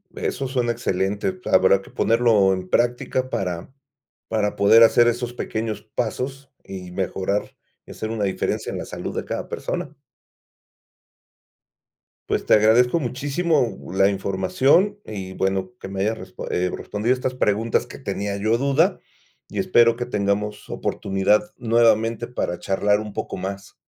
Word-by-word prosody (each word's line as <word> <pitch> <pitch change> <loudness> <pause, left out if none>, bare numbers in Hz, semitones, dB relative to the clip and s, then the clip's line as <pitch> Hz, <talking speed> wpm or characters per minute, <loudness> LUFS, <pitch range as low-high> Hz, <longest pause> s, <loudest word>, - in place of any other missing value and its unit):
Eso 135 - -2
suena 125 -2 0
excelente, 105 - -1
habrá 95 +1 +4
que - - -15
ponerlo 115 -4 +3
en 95 -1 -4
práctica 120 +4 0
para 90 -2 -3 0.6
para 105 -2 0
poder 105 +3 +7
hacer 120 +1 +6
esos 120 +1 -1
pequeños 110 -2 -3
pasos, 130 +4 -3
y 90 -2 -8
mejorar 95 +2 -2 0.3
hacer 110 - -6
una 110 -3 -1
diferencia 95 -1 -2
en - - -4
la - - -5
salud - - -6
de - - -3
cada - - -4
persona. - - -4 2.3
Pues - - 0
te - - +4
agradezco 115 +7 +5
muchísimo 140 - 0 0.2
la 95 +1 +4
información, 100 - +2
y 95 -3 -7
bueno 95 +1 -1
que - - -7
me 95 0 -4
haya 110 +3 +1
resp 95 -4 -12
eh, 90 +1 0
respondido 105 +6 -2
estas 130 0 -3
preguntas 115 0 +1
que - - -10
tenía 100 -5 -3
yo 110 +3 +1
duda, 140 +7 +2 0.5
y - - -9
espero 120 -12 +4
que 120 +1 -3
tengamos 105 -2 -2
oportunidad 100 - 0
nuevamente 115 -1 +2
para 90 -7 -3
charlar 105 +1 +1
un 105 -1 -7
poco 110 - -4
más. 95 +1 -6
110 Hz, 145 wpm, -23 LUFS, 95-120 Hz, 2.3 s, poder